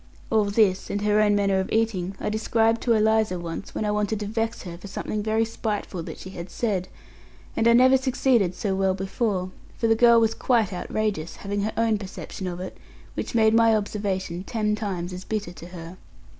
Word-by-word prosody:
All 220 -2 +4
this, 200 -2 +2
and 205 0 -2
her 210 0 +3
own 205 -1 +4
manner 200 -1 +2
of 190 - -3
eating, 200 -4 0
I - - -2
described 225 +1 +1
to 235 - +3
Eliza 220 -3 +2
once, 170 +2 -6
when 215 - -1
I 210 - +1
wanted 210 0 0
to - - -2
vex 225 +2 -2
her 175 -2 -7
for 180 +4 -10
something 210 +2 -3
very 220 +1 +1
spiteful 210 -5 -3
that - - -7
she 190 - -9
had 175 -1 -7
said; 190 -3 -1 0.7
and 225 - +2
I 235 - +7
never 260 +2 +6
succeeded 250 -7 +2
so 200 0 -1
well 190 0 +1
before, 190 -1 -2 0.3
for - - -1
the 225 - +5
girl 235 +1 +6
was 225 -1 +2
quite 225 -7 +1
outrageous, 190 -2 -2
having 200 0 -3
her 215 +2 -1
own 225 -2 +2
perception 190 -1 -7
of 175 -1 -4
it, 185 - -6 0.4
which - - -4
made 220 -1 +5
my 225 -1 +5
observation 195 -4 -2
ten 210 0 -1
times 190 -4 -3
as 180 +1 -7
bitter 210 -5 -3
to 170 -1 -11
her. 175 0 -9
210 Hz, 205 wpm, -25 LUFS, 185-225 Hz, 0.7 s, I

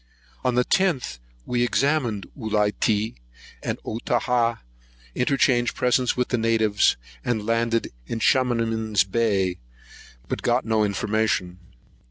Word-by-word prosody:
On 125 - +1
the 125 0 +3
10th, 165 - +1 0.3
we 120 -1 -1
examined 120 -4 +1
Ulitea 105 -2 0 0.5
and - - -3
Otaha, 120 +1 0 0.6
interchanged 125 -2 +2
presents 125 0 +1
with 125 - 0
the 120 - 0
natives, 110 -2 +2 0.3
and 110 -4 -1
landed 115 0 0 0.2
in - - -3
Chamanen's 115 -5 +2
Bay; 95 -3 0 0.7
but - - -3
got - - +1
no 110 -1 +2
information. 100 -3 -1
115 Hz, 110 wpm, -24 LUFS, 105-125 Hz, 0.7 s, the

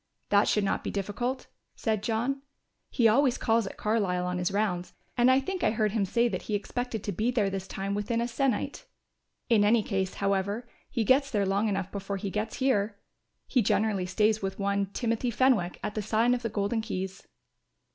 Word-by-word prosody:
"That 200 0 +4
should 210 - +2
not 195 - 0
be - - -3
difficult," 240 +6 -2 0.3
said 220 -3 -1
John. 240 +5 -1 0.5
"He 235 -3 +3
always 255 +3 +4
calls 225 -2 +2
at - - -8
Carlisle 200 -5 0
on 180 0 -2
his 180 +1 0
rounds 195 -3 -1 0.2
and 245 0 +4
I 260 +1 +6
think 370 +7 -4
I - - +4
heard 215 -1 +1
him 210 -2 +1
say 235 +5 +2
that 185 -6 -3
he 210 - -2
expected 235 +1 -3
to 205 - -2
be 215 +6 0
there 215 -6 +1
this 190 -1 -4
time 195 +1 -3
within 210 +3 -1
a 235 - 0
sennight. 270 - -1 0.6
In 225 -4 +4
any 215 +1 +4
case, 190 -2 -2
however, 200 +4 -1 0.2
he 235 - 0
gets 270 +5 +4
there 205 -4 +1
long 200 +3 +1
enough 195 -2 -2
before 200 0 -4
he 195 0 -4
gets 215 +2 -2
here. 215 -6 +1 0.5
He 255 - +2
generally 200 -3 +1
stays 215 +3 +2
with 195 -1 -3
one, 200 0 0
Timothy 230 +4 -1
Fenwick, 235 -7 +2
at - - -2
the 215 - -2
sign 220 +4 +2
of 245 - -1
the 230 - -2
Golden 210 +2 -1
Keys." 190 -3 -5
215 Hz, 200 wpm, -28 LUFS, 195-235 Hz, 0.6 s, I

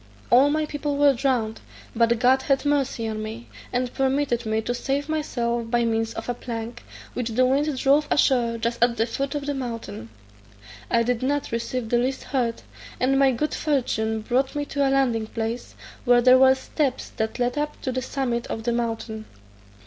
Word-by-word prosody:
All 260 +4 +6
my 310 +1 +1
people 290 -1 -3
were 285 -1 +5
drowned, 240 -4 -1 0.3
but 230 0 +3
God 255 +3 +4
had 275 +1 +1
mercy 275 -5 0
on 215 -1 -3
me, 220 +2 -7 0.2
and 250 0 -1
permitted 265 -3 0
me 220 0 +1
to 245 - -1
save 275 +3 -2
myself 240 -7 -2
by 240 0 +2
means 225 0 -1
of 225 - -6
a 245 - 0
plank, 235 0 -6 0.3
which 245 -2 -2
the 250 +3 +3
wind 280 +2 +1
drove 285 +3 +3
ashore 240 -5 +2
just 235 +1 0
at 240 -1 +2
the 225 - +2
foot 275 +4 -3
of 290 -1 -3
the 290 - -1
mountain. 230 - -6 0.8
I 230 - +3
did 245 0 0
not 285 +2 -1
receive 235 0 -3
the 240 - +3
least 260 +2 -1
hurt, 240 -4 -2 0.4
and 270 +2 +2
my 270 -1 +5
good 300 +5 -1
fortune 220 -7 0
brought 255 +5 0
me 290 0 -1
to 285 - -3
a 270 - +3
landing 250 -5 +1
place, 230 +2 -4 0.3
where 245 -1 +5
there 255 +1 +7
were 265 0 +6
steps 265 0 -2
that 220 0 -2
led 245 0 0
up 295 0 -3
to 260 - -1
the 255 0 -2
summit 245 -3 -2
of 225 - -4
the 235 +1 0
mountain. 225 -2 -3
245 Hz, 195 wpm, -24 LUFS, 230-275 Hz, 0.8 s, there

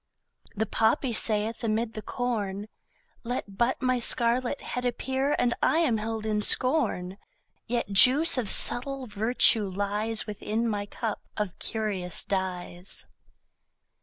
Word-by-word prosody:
The 220 +1 0
poppy 225 +4 +1
saith 215 +1 +1
amid 225 +1 -1
the 215 - -6
corn: 210 -4 -3 0.6
Let 230 -4 -5
but 245 +2 0
my 255 -1 +1
scarlet 240 +3 +2
head 250 - -5
appear 265 +3 -1
And 245 -1 +1
I - - +2
am 300 -9 +2
held 220 0 -4
in 210 -1 0
scorn; 210 - +1 0.5
Yet 235 -3 -2
juice 260 - +6
of 220 -6 -1
subtle 270 +2 0
virtue 220 -1 +4
lies 205 +3 -1
Within 215 +2 -3
my 205 -2 -3
cup 220 0 -4 0.2
of 210 -4 -4
curious 200 -5 -3
dyes. 185 -1 -3
220 Hz, 130 wpm, -27 LUFS, 205-245 Hz, 0.6 s, juice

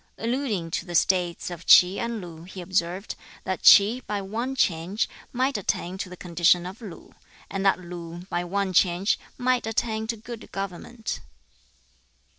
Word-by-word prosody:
Alluding 225 -8 -2
to 170 - -2
the 175 - -5
States 180 0 +1
of 175 0 -7
Ts'i 180 +2 +7
and 235 -2 -3
Lu, 165 -3 -10
he 185 +2 -10
observed, 185 +1 -1 0.3
that 190 -1 -3
Ts'i, 215 +5 +8
by 205 -1 -1
one 230 +7 -3
change, 185 -1 +1 0.2
might 255 -1 0
attain 185 -1 -2
to 185 - -4
the 180 - -10
condition 175 0 +2
of 190 +6 -8
Lu; 200 -7 -10 0.4
and 195 0 -2
that 195 - +4
Lu, 175 -1 -8
by 175 -2 -2
one 190 +1 -1
change, 180 +3 +3 0.2
might 250 -2 +1
attain 220 0 -1
to 230 0 -2
good 225 +1 -9
government. 200 +4 -5
190 Hz, 160 wpm, -25 LUFS, 175-225 Hz, 0.4 s, Ts'i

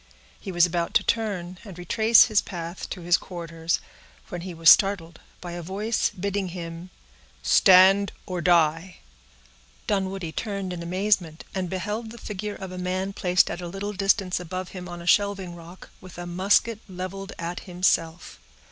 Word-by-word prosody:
He 195 - -6
was 175 -1 +5
about 170 -1 -2
to - - +5
turn, 185 -6 -2
and 195 -6 -11
retrace 220 +6 +5
his 215 -3 +2
path 170 -1 -7
to 180 - -6
his 175 +1 +3
quarters, 165 -2 -3 0.5
when 175 - -5
he 185 +1 -6
was 165 -1 -3
startled 175 -5 +5 0.2
by 175 - -7
a 175 0 -5
voice, 205 +6 -1
bidding 200 +1 -3
him,— 170 0 -7 0.5
"Stand 195 +1 +6
or 180 -2 -4
die!" 170 +1 +2 0.9
Dunwoodie 190 -4 -2
turned 200 -1 -4
in 175 - -6
amazement, 180 -2 0
and 185 -2 -2
beheld 210 +5 -3
the 235 - -10
figure 210 -1 -5
of 190 -1 -8
a 185 - -6
man 185 +2 -2
placed 180 -1 +2
at 175 - -5
a 175 - -5
little 195 +3 -5
distance 195 -2 +1
above 185 +1 -5
him 180 -1 -8
on 175 0 -8
a - - -11
shelving 195 -1 +2
rock, 170 +2 -13
with 185 -2 -12
a 175 - -6
musket 195 +5 +2
leveled 190 +2 -6
at 170 +1 -4
himself. 175 -2 0
185 Hz, 165 wpm, -25 LUFS, 175-195 Hz, 0.9 s, Stand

